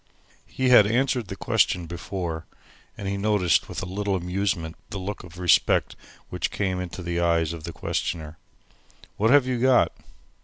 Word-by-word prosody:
He 130 -1 0
had 110 -5 +8
answered 125 0 +1
the - - -6
question 90 -2 +1
before, 85 -1 -5 0.5
and 100 - -5
had 100 0 -2
noticed 100 -5 +2
with - - -5
a - - -3
little 100 +2 -2
amusement 90 -2 -2
the - - -5
look 95 +2 -5
of 90 -1 -13
respect 90 -2 +3 0.3
which - - -2
came 95 -2 -2
into 90 0 -6
the 85 0 -2
eyes 85 -2 +1
of 80 -1 -8
the 85 - -5
questioner. 80 -1 -4 0.8
"What 110 +2 +2
have 140 0 +6
you 130 -2 -1
got!" 130 0 +4
95 Hz, 165 wpm, -25 LUFS, 85-105 Hz, 0.8 s, had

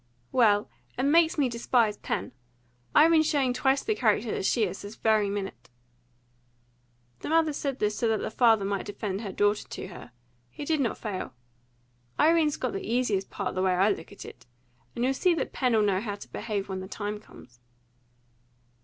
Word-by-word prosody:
"Well, 210 -4 +3 0.3
it 255 - -1
makes 320 +4 +4
me 285 -3 +3
despise 235 -2 +1
Pen! - - -3 0.6
Irene's 315 0 +6
showing 270 -4 +1
twice 265 +2 +1
the 435 - +1
character 225 - +1
that - - -2
she 235 - +2
is, 195 -1 -3
this 205 +2 -9
very 215 -2 +2
minute." 200 -1 -5 1.5
The - - -6
mother 320 -1 +3
said 280 -2 -3
this 210 -3 -1
so 235 - +1
that 220 -1 +2
the - - -4
father 225 -3 +4
might 200 -1 -2
defend 205 -1 -4
her 205 -4 -5
daughter 205 +2 +1
to - - -7
her. 175 - -11 0.4
He 290 - -8
did 315 0 +1
not 245 -5 0
fail. 195 - -5 0.8
"Irene's 315 -2 +4
got 255 - -2
the 195 - -3
easiest 220 -5 0
part, 200 - -4
the 185 - -1
way 185 -1 +2
I 195 +3 +4
look 165 -5 -6
at - - -10
it. - - -13 0.5
And 240 - -2
you'll 265 - +2
see 350 +5 +2
that - - -3
Pen'll 235 -5 +2
know 195 -2 +1
how 210 -3 -4
to 200 - -11
behave 210 -3 -3
when 190 -1 -4
the 185 - -7
time 210 +1 -4
comes." 120 - -17
220 Hz, 190 wpm, -27 LUFS, 200-265 Hz, 1.5 s, Irene's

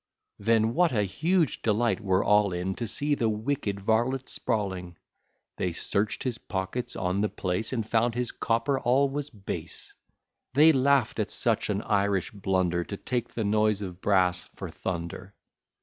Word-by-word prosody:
Then 110 +2 +2
what 175 +2 +3
a 105 -3 +2
huge 160 - +1
delight 115 +2 +1
were 95 -1 +2
all 105 -1 +4
in, 90 +2 -2
To 115 +3 -4
see 145 +7 +1
the 115 -5 +1
wicked 110 -2 -2
varlet 120 +5 +1
sprawling; 95 -7 -3 0.6
They 90 -2 -1
search'd 100 +5 -1
his 125 -3 -2
pockets 95 +5 -4
on 95 +1 0
the 105 - +1
place, 90 +4 -2
And 115 -5 -2
found 115 +1 +1
his 125 -1 -1
copper 115 +4 0
all 135 +3 +3
was 145 +1 -4
base; 105 -7 -7 0.6
They 155 +3 +8
laugh'd 135 -5 +2
at 105 - 0
such 115 -3 0
an 105 0 -1
Irish 100 -2 +1
blunder, 95 -3 0
To 100 - -6
take 120 +1 -3
the 115 - -1
noise 105 0 +2
of 90 -1 -7
brass 90 -3 +2
for - - -6
thunder. 95 +2 -5
105 Hz, 165 wpm, -27 LUFS, 95-125 Hz, 0.6 s, They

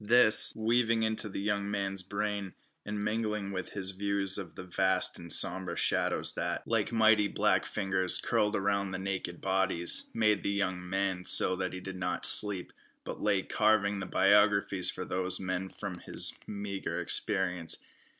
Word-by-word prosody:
This, 110 0 +5
weaving 115 0 +1
into 110 -1 -2
the 95 - -6
young 100 0 -2
man's 100 -2 -1
brain, 100 0 -4 0.3
and 105 0 -5
mingling 105 -2 -2
with 95 -1 -6
his 95 -2 -1
views 100 0 0
of 90 -5 -9
the - - -8
vast 95 +1 0
and 85 -1 -9
sombre 95 -2 +5
shadows - - +2
that, - - -4
like - - -1
mighty 110 -2 +3
black - - 0
fingers, 95 -3 -1
curled 105 0 0
around 100 0 -1
the 95 - -5
naked 95 -2 -5
bodies, 95 -2 +1
made 105 -2 +2
the - - -2
young 90 -3 -3
man 95 -1 -2
so 95 - +5
that 95 0 -4
he 95 - -6
did 95 0 -8
not 90 -1 -2
sleep, 100 -4 +5 0.3
but - - -8
lay 100 -2 +1
carving 105 -2 +1
the 95 - -6
biographies 100 -1 +2
for - - -5
these 95 0 -2
men 95 0 -4
from 95 -4 -8
his - - -2
meagre 100 -1 -5
experience. 90 -5 -2
100 Hz, 165 wpm, -30 LUFS, 95-105 Hz, 0.3 s, This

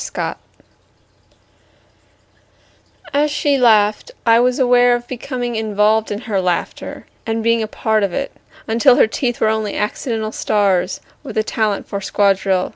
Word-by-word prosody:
Hysteria - - -4 2.8
As 295 +1 +2
she 290 -1 +1
laughed 215 - +3 0.2
I 230 0 +5
was 250 +1 +2
aware 245 -1 +4
of 240 0 -6
becoming 245 -1 -4
involved 215 0 +1
in 205 +1 -4
her 205 -5 -1
laughter 180 -2 -3 0.2
and 225 0 -1
being 230 0 +2
part 220 0 0
of 200 -2 0
it, 275 +8 -3 0.4
until 235 +3 +4
her - - +5
teeth 240 +2 -2
were - - +2
only 220 -1 -2
accidental 220 +1 -2
stars 195 -5 0 0.2
with - - -8
a 215 - +2
talent 215 -2 -1
for 200 - -4
squad 200 0 +2
drill. 190 -1 0
220 Hz, 145 wpm, -18 LUFS, 205-245 Hz, 2.8 s, I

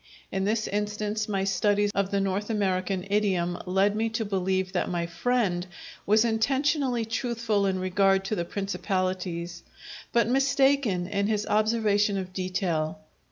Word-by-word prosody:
(In 190 0 -1
this 215 +1 0
instance 210 +1 -2
my 195 -2 0
studies 205 +2 +2
of 200 -1 0
the 200 - 0
North 195 +2 -1
American 190 -3 0
idiom 185 -4 +1
lead 195 +3 +2
me 225 +1 0
to 225 0 -2
believe 190 -1 -1
that 180 - 0
my 175 -1 -1
friend 185 0 0 0.4
was 215 +3 +4
intentionally 260 +2 +1
truthful 225 -3 0
in 190 -1 0
regard 195 +1 +2
to 215 - -1
the 175 - -1
principalities, 185 -3 -3 0.5
but 235 -1 +3
mistaken 270 -6 +2
in 200 +1 -1
his 210 -1 0
observation 210 -1 +2
of 185 -1 -5
detail.) 180 -4 -1
200 Hz, 145 wpm, -27 LUFS, 185-220 Hz, 0.5 s, was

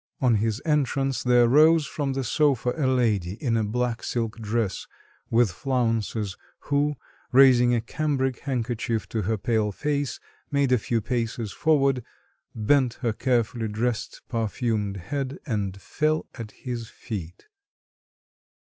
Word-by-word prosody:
On 125 -5 +3
his 110 +3 -1
entrance 135 -3 +1
there 125 -1 +4
rose 155 +4 +5
from 140 -1 -2
the 135 0 -2
sofa 125 -1 +2
a 145 -5 0
lady 110 -9 +1
in 120 0 -1
a 110 - +2
black 120 +2 -1
silk 115 -1 -3
dress 110 -2 -2 0.4
with 115 -3 +3
flounces, 115 -3 -1 0.3
who, 145 +1 +1 0.4
raising 125 -2 +6
a 115 - 0
cambric 135 0 -1
handkerchief 115 - -2
to 110 - -1
her 110 +3 0
pale 110 0 0
face, 145 +4 -2 0.3
made 140 -2 +1
a 125 - +4
few 115 +1 -1
paces 115 -2 -2
forward, 135 -4 +2 0.5
bent 120 +2 +2
her 115 - +2
carefully 120 -1 0
dressed, 110 +2 -2
perfumed 110 -3 -1
head, 135 +8 -4
and 100 -7 -2
fell 155 +9 0
at 115 -3 -7
his 120 -1 -6
feet.... 90 -6 -7
120 Hz, 135 wpm, -25 LUFS, 110-135 Hz, 0.5 s, raising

